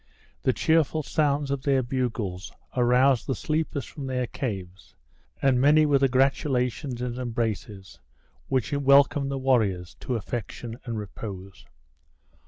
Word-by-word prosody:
The - - +2
cheerful 160 -1 +2
sounds 145 -1 0
of 140 -1 -1
their 135 -1 +2
bugles 115 -7 -3 0.2
aroused 125 0 +3
the 135 - 0
sleepers 155 -3 -2
from 140 -4 -8
their 125 -1 -1
caves; 95 -9 -6 0.5
and 130 -2 +4
many 150 +3 +5
were 145 -2 +3
the 135 - +4
gratulations 130 -1 0
and 125 0 -3
embraces 110 -5 -4 0.5
which 130 +3 -1
welcomed 140 0 +4
the 140 - -2
warriors 110 -10 +1
to 125 - -3
affection 115 +1 -5
and 115 -2 -3
repose. 100 -2 -8
130 Hz, 130 wpm, -26 LUFS, 115-140 Hz, 0.5 s, many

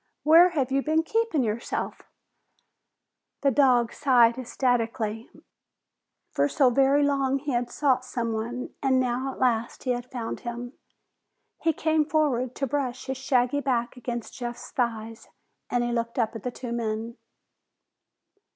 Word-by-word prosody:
Where 330 +4 +7
have 275 -6 -1
you 275 +1 +2
been 315 +3 +1
keeping 445 - 0
yourself?" 225 +1 -3 1.4
The 275 - +3
dog 245 -3 +3
sighed 245 -5 +4
ecstatically. 230 -3 -1 1.0
For 285 - +1
so 270 -3 +3
very 275 +3 +4
long 275 -1 +1
he 285 +1 -4
had 240 -1 -1
sought 260 -3 +1
someone 235 0 -3
and 265 -2 +3
now 255 +1 -1
at - - -11
last 235 -2 0
he 255 - 0
had 245 0 -3
found 235 -3 -4
him. 240 +1 -6 0.9
He 330 - +3
came 315 0 +1
forward 280 -5 0
to 275 - -1
brush 260 -2 -2
his 265 -1 -3
shaggy 260 +1 +1
back 245 -3 -1
against 240 -2 -5
Jeff's 240 -1 -6
thighs, 225 -2 -3 0.4
and 245 -1 +1
he 240 - -1
looked 235 +1 -2
up 230 -2 0
at 225 - -6
the 250 - -3
two 245 0 -7
men. 230 0 -3
250 Hz, 145 wpm, -26 LUFS, 235-275 Hz, 1.4 s, Where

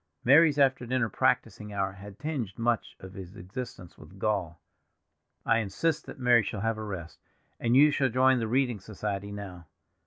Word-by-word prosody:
Mary's 150 +2 +6
after 135 -3 +2
dinner 125 -2 0
practicing 110 -4 0
hour 100 -1 -1
had 100 0 -12
tinged 140 -10 -4
much 115 -1 -1
of 95 0 -10
his 95 0 -9
existence 95 -2 -8
with 95 - -14
gall. 95 -5 -1 0.9
"I 115 - +3
insist 155 +9 -1
that - - -9
Mary 125 -2 +5
shall 105 0 -4
have 115 0 -1
a - - -4
rest. 90 -6 -7 0.4
And 120 +1 +1
you 150 +2 +7
shall 135 -2 +1
join 130 +1 +4
the 115 - -1
reading 125 -2 +1
society 100 0 -5
now. 95 -5 -8
110 Hz, 175 wpm, -28 LUFS, 100-130 Hz, 0.9 s, you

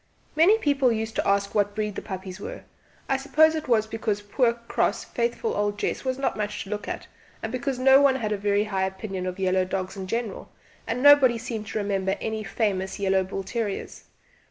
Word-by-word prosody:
Many 350 +8 +6
people 280 - +2
used 220 0 -3
to - - 0
ask 200 0 +1
what 205 -1 +1
breed 210 -1 -2
the - - -5
puppies 190 -1 -7
were - - -7 0.4
I 270 - +2
suppose 310 +4 +4
it 315 -1 -4
was 225 -3 +3
because 220 -2 -2
poor 235 +3 +2
cross 235 0 -1
faithful 470 -1 -2
old 205 0 -1
Jess - - -2
was 260 -1 -1
not 275 - -1
much 210 0 -3
to 195 - -11
look 210 0 -4
at, - - -5 0.4
and - - -3
because 255 +1 -2
no 265 +2 +6
one 275 -2 +5
had 220 -5 -2
a 210 - 0
very 205 0 +2
high 190 -3 -1
opinion 190 -1 -5
of 185 +1 -4
yellow 185 -1 +2
dogs 185 0 -3
in 190 -1 -6
general, 230 0 -3 0.4
and 245 +3 -2
nobody 285 -5 +7
seemed 225 -2 -5
to 220 - -4
remember 195 -2 0
any 220 -1 -3
famous 195 -3 -1
yellow 190 -1 +2
bull 195 +1 -5
terriers. 205 0 -4
215 Hz, 205 wpm, -25 LUFS, 195-255 Hz, 0.4 s, nobody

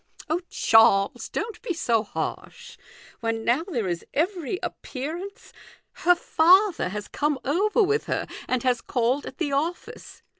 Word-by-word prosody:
" - - -16
Oh, 340 +3 +1
Charles, 200 -3 +4
don't 455 - -4
be 465 -8 -3
so 235 -8 +1
harsh; 480 - -6 0.4
when 225 -1 -2
now 245 +6 +3
there 260 - -3
is 175 -1 -3
every 350 +1 -1
appearance 330 +9 -6 0.4
Her 355 -1 +3
father 355 - +4
has 205 +2 -5
come 295 -1 -1
over 410 - +2
with 425 +3 +1
her, - - -2 0.2
and 255 -2 -1
has 250 -2 +1
called 250 +3 0
at 265 - -9
the 310 -5 -2
office. 315 +6 -4
295 Hz, 150 wpm, -25 LUFS, 235-365 Hz, 0.4 s, Charles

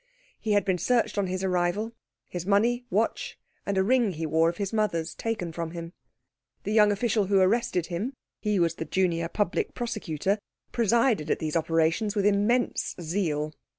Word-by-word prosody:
He 215 - 0
had 205 - +3
been 185 -2 +1
searched 235 -2 +1
on 195 - +1
his 185 +1 -3
arrival 185 +4 0 0.4
his 175 -2 -5
money, 230 +6 +2
watch, 230 - -1 0.3
and 200 -1 0
a 190 - +4
ring 235 -2 +2
he 160 0 -4
wore 160 +2 +3
of 170 - -5
his 200 0 -3
mother's 205 -7 0
taken 215 -7 -3
from 165 0 -4
him. 170 0 -7 0.7
The 210 - -3
young 210 -1 +6
official 210 0 +1
who 195 0 +4
arrested 190 -2 +2
him 195 +10 -3 0.3
he 210 -2 0
was 170 -1 +2
the 165 - -5
Junior 170 -3 0
Public 205 -1 -1
Prosecutor 205 - -2 0.3
presided 230 - +2
at - - +2
these 155 0 -3
operations 165 +6 +1
with 200 -1 +1
immense 210 +5 +1
zeal. 155 -3 -1
195 Hz, 175 wpm, -27 LUFS, 170-215 Hz, 0.7 s, young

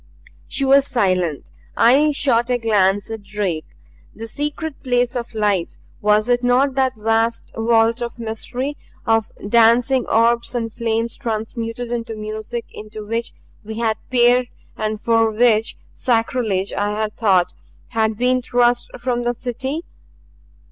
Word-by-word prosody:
She 275 - -1
was 275 +1 +5
silent. 185 - 0 0.3
I 280 +6 +5
shot 250 -4 +2
a 250 - +2
glance 205 -2 +1
at 225 -1 -5
Drake. 195 -6 -3 0.5
The 225 - -7
secret 295 +5 -4
place 245 -1 0
of 235 -1 -5
light 205 -5 0 0.2
was 210 +1 +3
it 245 0 +2
not 255 +3 +3
that 260 -1 +1
vast 225 +2 0
vault 225 +1 +2
of 235 0 -4
mystery, 245 +5 -4 0.3
of 225 -2 +1 0.2
dancing 235 +4 +4
orbs 235 +2 +2
and 225 -2 -2
flames 230 0 -1
transmuted 230 0 -4
into 230 -1 -3
music 215 +2 -5
into 215 0 -9
which 230 +2 -2 0.3
we 220 +1 -7
had 225 -2 0
peered 245 0 +4 0.3
and 215 -1 -2
for 225 0 +3
which 220 0 +2 0.2
sacrilege, 225 -5 0
I 205 +1 -1
had 215 -1 -2
thought, 190 -5 +2 0.4
had 220 -2 0
been 250 +1 +2
thrust 245 0 +2
from 245 -1 -1
the 240 0 -1
City? 265 +6 -4
230 Hz, 140 wpm, -20 LUFS, 215-245 Hz, 0.5 s, was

